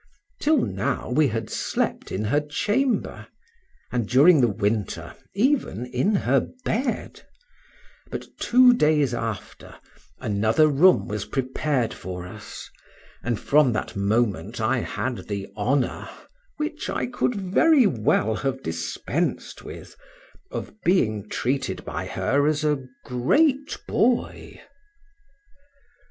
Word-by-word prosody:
Till 310 +1 +3
now 95 +5 -2
we 150 +3 +4
had 115 -2 -3
slept - - -2
in 95 - -2
her 120 +8 +2
chamber, 210 - -1 0.6
and 120 -4 -1
during 145 +4 +6
the 120 - +5
winter, 105 0 -2 0.2
even 235 - +1
in 125 +12 0
her 135 -7 +2 0.2
bed; 245 +2 -2 0.9
but - - -5
two 250 0 +6
days 150 - +2
after 115 -4 -5 0.4
another 110 +9 +2
room 155 +6 +4
was 105 0 -3
prepared 130 -2 -1
for 90 -1 -7
us, 90 - -9 0.5
and 120 -3 -2
from 145 -2 +3
that - - -3
moment 100 -1 0
I 120 +4 +1
had 125 +1 -4
the 100 -2 -4
honor 125 +5 -1 0.5
(which 305 0 -3
I - - -1
could 245 0 -1
very 230 - +4
well 110 - +1
have 135 -1 -3
dispensed 85 0 -3
with) - - -10 0.5
of - - -6
being 110 - +1
treated 135 +3 -2
by - - -4
her 145 +2 +1
as 155 0 +1
a 145 -4 0 0.2
great 275 - +1
boy. 240 +1 0
130 Hz, 115 wpm, -24 LUFS, 110-185 Hz, 0.9 s, during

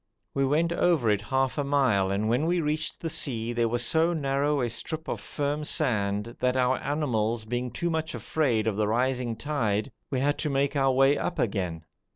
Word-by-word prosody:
We 135 - +1
went 160 +5 +2
over 160 -11 +2
it 105 -1 +1
half 130 +6 0
a - - +1
mile, 130 -9 +2
and 100 +2 0
when 125 +8 +1
we 175 +1 +2
reached 155 0 -2
the 165 - -2
sea 120 -5 -1
there 120 -1 +1
was 120 +1 0
so 165 +6 +3
narrow 140 -1 0
a 120 - +1
strip 160 +7 -4
of - - -3
firm 145 +1 -2
sand 105 -4 -1
that, 125 0 +1
our 130 0 +2
animals 120 -7 -1
being 120 +2 -2
too 170 +8 -2
much 160 0 -2
afraid 125 -9 0
of 110 -3 0
the 105 -1 +1
rising 125 +1 0
tide, 115 -3 -1 0.2
we 130 - -1
had 145 +2 +1
to 150 - -1
make 140 +1 0
our 135 -1 +3
way 135 +2 +4
up 175 - -2
again. 90 -7 -2
130 Hz, 200 wpm, -27 LUFS, 115-145 Hz, 0.2 s, way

